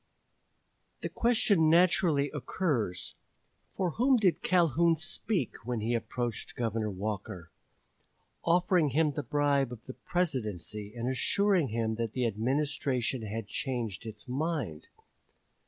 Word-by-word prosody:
The - - -3
question 205 -8 +3
naturally 165 -4 +4
occurs, 135 - -2 0.6
for 180 -3 0
whom 255 - +3
did 190 -6 +2
Calhoun 170 -2 +3
speak 165 - -2
when 120 0 -2
he 115 +3 0
approached 120 -1 -3
Governor 115 -2 -1
Walker, 100 -3 -5 0.9
offering 175 -2 +3
him 150 +3 +2
the 150 - -3
bribe 140 -1 +1
of 120 -2 -9
the 130 - -7
Presidency 105 - -2
and 120 +1 -3
assuring 180 +6 +2
him 110 -1 -1
that 115 -2 -2
the 125 -1 0
Administration 130 +2 0
had 110 0 -4
changed 115 -3 -3
its 110 +3 -9
mind? 135 - -2
130 Hz, 120 wpm, -30 LUFS, 110-165 Hz, 0.9 s, naturally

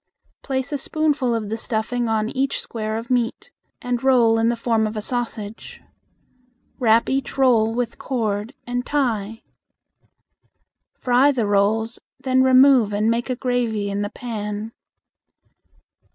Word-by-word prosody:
Place 265 0 -3
a 290 - -2
spoonful 290 -5 0
of 215 -2 -3
the 225 - -2
stuffing 230 +1 -2
on 220 -1 0
each 270 +2 -1
square 215 -1 -4
of 230 +2 -7
meat, 245 -1 -1 0.3
and 245 0 -2
roll 235 -4 +4
in 225 +1 +2
the 240 - +1
form 230 -2 +1
of 215 +1 -6
a - - 0
sausage. 225 -2 -5 1.0
Wrap 230 -2 +4
each 270 -1 -2
roll 235 -5 +4
with 245 -1 -3
cord 220 -1 -2
and 245 0 -2
tie. 225 -7 -2 1.5
Fry 255 +3 +3
the 245 -5 -1
rolls, 210 +3 +1 0.2
then 260 -1 +2
remove 260 -4 +5
and 215 +2 +2
make 235 +2 -2
a 255 - 0
gravy 235 -5 -1
in 200 +1 -2
the 205 - -2
pan. 215 -2 -5
235 Hz, 140 wpm, -22 LUFS, 220-255 Hz, 1.5 s, remove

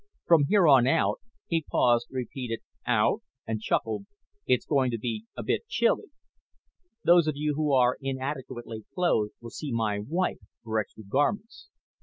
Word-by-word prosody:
From 160 -4 +5
here 195 -4 +5
on 130 -4 +6
out 165 +5 +2 0.2
" - - -45
he 165 -1 +1
paused, 120 -1 +3
repeated 125 -2 -4 0.3
"out" - - +2 0.2
and 110 -1 -3
chuckled 110 - -1 0.4
"it's 125 -1 +2
going 135 -4 +2
to 115 - -2
be 110 -1 -4
a - - -4
bit - - -1
chilly. 475 -2 +1 1.0
Those 170 -2 +5
of 155 - 0
you 150 0 0
who 150 0 0
are 125 -2 +4
inadequately 130 -4 -5
clothed 140 - +1
will 115 -1 -9
see 150 -3 -5
my 110 -3 0
wife 165 - -1 0.2
for 110 -1 -1
extra 110 +1 -6
garments. 200 - -1
130 Hz, 160 wpm, -27 LUFS, 115-155 Hz, 1.0 s, on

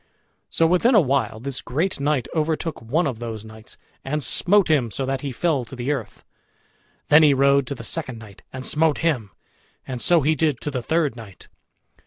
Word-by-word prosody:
So 165 - +2
within 180 +9 +3
a - - +8
while 135 - 0
this 130 +1 -4
great 165 +8 -2
knight 140 -3 0
overtook 160 0 -2
one 145 +10 0
of 130 -6 -3
those 110 -2 -6
knights, 110 0 -11 0.3
and 150 +2 -2
smote 195 - +3
him 145 -7 +2
so 130 +6 -3
that 135 0 -2
he 140 - -4
fell 145 0 0
to 125 - -10
the 125 +3 -2
earth. 120 -7 -5 0.9
Then 150 +2 +7
he 150 -3 +5
rode 140 0 +3
to 140 - -4
the 115 - -9
second 130 -2 -2
knight 110 -3 -13
and 130 0 -7
smote 155 -1 +2
him, 125 -11 0 0.6
and 125 -2 -6
so 170 -2 +4
he 150 +3 +2
did 150 -3 0
to 150 - -4
the 130 -2 -3
third 155 -1 0
knight. 110 -5 -13
140 Hz, 200 wpm, -22 LUFS, 120-155 Hz, 0.9 s, a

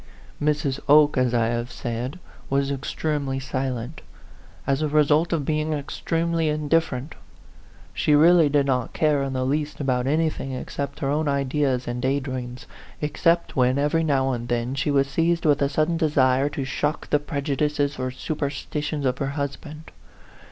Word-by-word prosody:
Mrs. 145 -2 0
Oke, 150 0 +6
as 130 -2 +2
I 115 -2 +2
have 120 +1 -2
said, 120 +6 -4 0.3
was 140 0 +1
extremely 140 0 -2
silent, 130 +1 -4 0.6
as 135 +1 +1
a 155 - +1
result 150 +2 +3
of 160 -5 0
being 155 +1 0
extremely 165 +3 -1
indif 155 +2 +2
ferent. 130 +3 -5 0.8
She 150 - +2
really 165 0 +6
did 145 -1 +2
not 130 -2 -1
care 150 -2 +2
in 135 -1 -2
the 130 0 -1
least 145 +2 -1
about 130 -3 0
anything 155 -2 0
except 140 +2 -5
her 135 - 0
own 150 +1 0
ideas 140 -2 0
and 120 0 -3
day 135 +2 +1
dreams, 130 -1 -6 0.3
except 165 +3 +1
when, 130 0 +3
every 150 +3 +1
now 135 -3 +1
and 120 -1 -4
then, 120 +1 -1
she 140 +2 -1
was 140 -1 +3
seized 165 +4 0
with 145 -1 +3
a 140 - +2
sudden 155 +3 +1
desire 140 -4 +2
to 145 -2 -4
shock 150 +3 -2
the 150 - +4
prejudices 145 -1 -1
or 130 0 -1
superstitions 145 +1 -3
of 125 0 0
her 140 - -1
husband. 150 +2 -5
140 Hz, 165 wpm, -24 LUFS, 130-150 Hz, 0.8 s, Oke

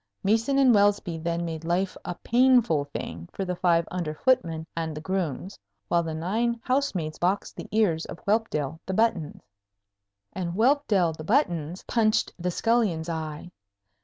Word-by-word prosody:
Meeson 225 +7 +2
and 265 -3 +6
Welsby 200 -5 +2
then 170 +1 -2
made 165 -1 -5
life 180 +3 0
a 180 - -4
painful 240 - +4
thing 85 - -7
for 195 - -4
the 180 0 -2
five 170 -2 +2
under 170 -4 -3
footmen 165 -10 +1
and 160 -2 -3
the - - -5
grooms, 185 - -3 0.3
while 170 - +3
the 160 -1 -4
nine 225 +8 -1
house 275 -1 0
maids 155 -3 -3
boxed 185 +3 0
the - - -8
ears 195 -7 +2
of - - -7
Whelpdale 165 -9 0
the 190 - -2
Buttons, 195 -9 0 0.9
and 175 -2 -3
Whelpdale 220 - +3
the 155 - -8
Buttons 175 - 0
punched 215 -2 +1
the 180 +1 -1
scullion's 190 -5 +1
eye. 160 +1 -5
180 Hz, 160 wpm, -26 LUFS, 160-220 Hz, 0.9 s, and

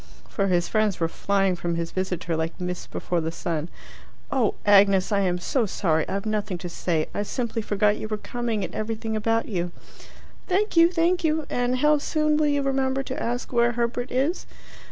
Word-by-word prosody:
For 195 -2 -1
his 175 -2 +2
friends 215 -3 +1
were 165 - +2
flying 195 +2 +1
from 170 -1 -2
his 170 0 -3
visitor 180 -3 -2
like 160 +3 -3
mists 180 0 -4
before 175 -1 -2
the 160 +1 -2
sun. 165 -1 -3 0.6
"Oh, 250 -6 +1
Agnes, 200 -2 +5
I 200 - +3
am 180 -2 +1
so 225 +6 0
sorry; 160 -5 0
I've 195 +2 -2
nothing 210 -3 -1
to 175 +1 -6
say. 165 -2 -1
I - - -1
simply 230 +2 -2
forgot 210 0 +2
you - - -5
were 215 -1 -2
coming, 230 -1 -3
and - - -5
everything 220 0 -3
about 225 +1 0
you." 175 -4 -2 0.8
"Thank 405 +2 +1
you, 335 +1 +6
thank 350 +1 +1
you! 315 -1 +1
And 245 +1 +1
how 300 0 +5
soon 305 +1 +1
will 305 -1 +3
you 285 -1 +1
remember 270 0 0
to 265 +4 -5
ask 245 0 -3
where 235 0 +3
Herbert 240 +1 -2
is?" 275 +8 0
215 Hz, 195 wpm, -25 LUFS, 180-255 Hz, 0.8 s, you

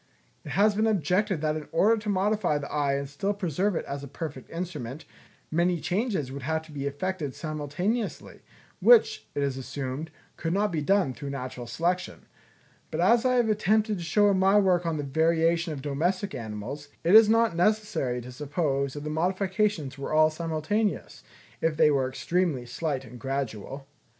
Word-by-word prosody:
It - - -6
has 210 +2 +4
been 215 +2 +1
objected 190 -2 +1
that 155 -1 0
in 155 -2 -6
order 205 +7 +4
to 210 -1 -5
modify 200 -4 +1
the 145 -1 -6
eye 145 -2 +1
and 140 0 -3
still 195 +9 -2
preserve 190 +1 0
it - - -2
as 140 0 -5
a - - -6
perfect 140 -1 -7
instrument, 160 -6 -6 0.5
many 170 +1 +2
changes 190 - -1
would 140 +1 -6
have 160 +3 -1
to 160 - -15
be 140 -1 -3
effected 150 0 -3
simultaneously, 165 +9 -3 0.4
which, 485 -2 +5
it 145 - 0
is 135 -2 -1
assumed, 135 +3 -5 0.3
could 165 +1 -2
not 205 +1 +1
be 160 -3 -1
done 185 -3 +2
through 140 +2 -7
natural 130 -3 -6
selection; 175 +8 -2 0.6
but - - -4
as 235 +1 +4
I 255 0 +3
have 240 -2 +3
attempted 215 -1 +2
to - - -5
show 205 +6 +3
in 190 - +1
my 195 +2 +5
work 180 -4 +3
on 165 -2 -1
the 145 - -3
variation 165 +3 +2
of 140 -3 -6
domestic 175 +7 -1
animals, 120 +5 -6 0.2
it 170 +3 +3
is 220 0 +9
not 225 -4 +3
necessary 175 - +1
to 125 +1 -9
suppose 140 0 -1
that 145 - -6
the 150 - -3
modifications 185 -3 0
were 140 - -4
all 155 0 +5
simultaneous, 165 +6 -2 0.4
if 160 -2 +1
they 150 - +5
were 135 -2 +1
extremely 160 -2 -1
slight 135 +1 -3
and 125 0 -11
gradual. 135 -1 -4
160 Hz, 180 wpm, -27 LUFS, 140-195 Hz, 0.6 s, is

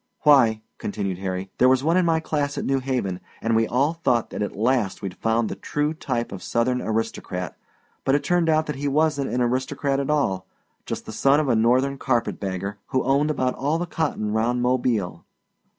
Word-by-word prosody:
"Why," 120 -7 +5 0.2
continued 100 -3 -3
Harry, 95 -1 -2
"if 95 - -22
there 125 - +6
was 130 0 +3
one 165 +3 +2
in 185 -2 +3
my 165 -1 +3
class 145 -3 -2
at - - -2
New 135 0 +1
Haven, 125 -9 -2 0.2
and 115 0 0
we 115 0 +3
all 140 +7 +1
thought 125 -8 0
that - - -4
at 105 - -3
last 115 -2 0
we'd 95 -2 -3
found 115 0 +1
the - - -3
true 150 +1 -1
type 120 -6 -3
of 95 -2 -7
Southern 125 +6 0
aristocrat, 110 -5 -3 0.5
but 135 - +3
it 145 - 0
turned 175 -2 +2
out 155 0 +3
that 150 -3 -4
he 145 +1 -2
wasn't 145 -1 +1
an 125 - 0
aristocrat 135 +3 0
at 140 - -2
all 95 -12 0 0.4
just - - -4
the - - -7
son 135 +6 +3
of 150 -3 0
a 120 - +4
Northern 130 +5 +2
carpetbagger, 100 -5 -2
who 130 - 0
owned 140 +3 +2
about 130 -4 0
all 145 +4 0
the 175 - -2
cotton 150 -11 -2
round 120 +3 +1
Mobile." 125 -6 0
125 Hz, 205 wpm, -24 LUFS, 110-145 Hz, 0.5 s, there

